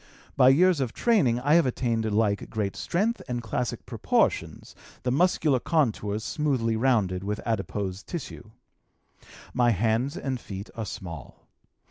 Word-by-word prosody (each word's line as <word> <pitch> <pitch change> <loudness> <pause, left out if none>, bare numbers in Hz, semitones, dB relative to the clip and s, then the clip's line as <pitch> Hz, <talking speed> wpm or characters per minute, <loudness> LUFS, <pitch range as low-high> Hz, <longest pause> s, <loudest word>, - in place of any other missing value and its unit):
By 130 - +6
years 175 +4 +4
of 130 -4 -2
training 170 - +2
I 145 +4 +2
have 165 -4 +5
attained 115 -3 -1
alike 105 -1 0
great 105 -3 -2
strength 215 +7 -1
and 120 -2 -3
classic 115 +1 -3
proportions, - - 0 0.3
the 125 - 0
muscular 150 -2 +2
contours 110 -9 0
smoothly 130 -7 0
rounded 110 -7 +1
with 105 +1 -3
adipose 100 -3 -2
tissue. 135 - -7 1.0
My 120 -1 +3
hands 115 - +1
and 135 -8 -3
feet 100 -1 -8
are 110 -3 -4
small. 85 - -9
120 Hz, 135 wpm, -26 LUFS, 105-140 Hz, 1.0 s, By